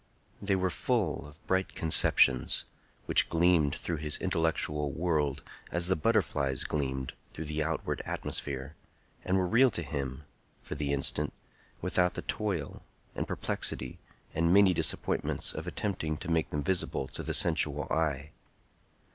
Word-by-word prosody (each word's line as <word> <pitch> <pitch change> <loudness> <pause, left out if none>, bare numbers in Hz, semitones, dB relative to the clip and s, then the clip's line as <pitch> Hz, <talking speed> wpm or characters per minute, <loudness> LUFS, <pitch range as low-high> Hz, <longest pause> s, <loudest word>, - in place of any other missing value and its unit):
They 100 -1 +2
were 95 -1 +1
full 100 - 0
of 75 +3 -17
bright 95 0 0
conceptions, 65 -5 +3 0.4
which - - +2
gleamed 80 -3 +4
through 85 0 -2
his 75 0 0
intellectual 80 -4 0
world 75 -4 0 0.3
as 85 0 +2
the 95 +1 +2
butterflies 75 - +1
gleamed 65 -3 -2 0.2
through 80 - -4
the 75 +1 -2
outward 80 +1 -1
atmosphere, 70 +1 -4 0.5
and 95 +1 +2
were 95 - +2
real 125 +8 +5
to 85 -6 -4
him, 70 -2 -4 0.4
for - - -5
the 75 -1 -2
instant, 70 -1 0 0.5
without 90 0 +2
the - - -4
toil, 95 -9 -2 0.3
and - - -3
perplexity, 65 - -2 0.3
and 85 +1 +2
many 100 -1 +7
disappointments - - 0
of - - -5
attempting 80 -7 -2
to 85 - -5
make 80 -1 +2
them 75 -1 -2
visible 85 -5 0
to - - -6
the - - -2
sensual - - +2
eye. 75 -2 0
80 Hz, 145 wpm, -31 LUFS, 75-90 Hz, 0.5 s, many